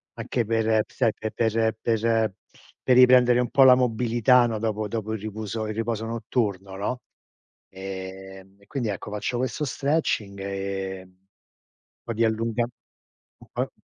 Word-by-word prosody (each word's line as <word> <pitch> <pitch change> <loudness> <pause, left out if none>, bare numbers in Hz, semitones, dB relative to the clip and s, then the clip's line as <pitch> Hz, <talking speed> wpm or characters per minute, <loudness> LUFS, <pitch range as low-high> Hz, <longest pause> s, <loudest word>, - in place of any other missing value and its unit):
anche 120 - -2
per 110 -1 +2
p - - -50
sai, 115 -4 +1
pe 110 - -5
per 110 -1 +1
per 115 -2 +1 0.5
per 125 - +4
riprendere 125 -1 +6
un 125 - 0
po' 140 - +4
la 130 -1 +9
mobilità, 120 0 +3
no, 115 -2 -2
dopo 110 -1 -2
dopo 110 0 -3
il 110 - -3
ripuso 110 +1 -4
il 110 - -4
riposo 115 0 -2
notturno, 105 -4 -2
no? 105 +6 -3 0.7
Ehm 95 0 -8
e - - -21
quindi 125 -6 -2
ecco, 100 +1 -5
faccio 105 +4 -2
questo 130 +4 -2
stretching, 135 -9 -1
ehm, 95 -1 -5 0.8
po' 115 - -4
di 115 +1 +2
allunga 115 +1 0
n - - -10 0.8
po - - -2
110 Hz, 150 wpm, -25 LUFS, 100-120 Hz, 0.8 s, la